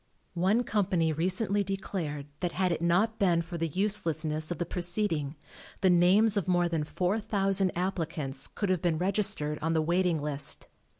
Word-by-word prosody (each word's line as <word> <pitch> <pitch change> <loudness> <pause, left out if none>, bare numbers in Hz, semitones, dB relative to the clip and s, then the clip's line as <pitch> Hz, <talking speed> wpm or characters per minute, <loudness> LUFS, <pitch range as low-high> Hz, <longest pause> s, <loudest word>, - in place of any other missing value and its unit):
One 210 +7 +2
company 185 -7 0
recently 190 +5 +1
declared 180 -7 -4
that, 175 -2 -2
had 185 -1 0
it 165 - -2
not 195 +7 +1
been 175 -4 +2
for 170 0 -7
the 165 - 0
uselessness 160 -4 +2
of 175 - -3
the 175 - -2
proceeding, 175 -4 -1 0.5
the 190 -2 +4
names 195 +5 +4
of 195 - -1
more 175 -1 +2
than 165 -3 -1
4,000 195 +2 0
applicants 160 -7 -2
could 205 - -4
have 185 -3 +1
been 170 -3 0
registered 185 -5 0
on 165 +1 0
the 160 - +2
waiting 175 0 +1
list. 145 -1 -1
175 Hz, 165 wpm, -29 LUFS, 160-195 Hz, 0.5 s, the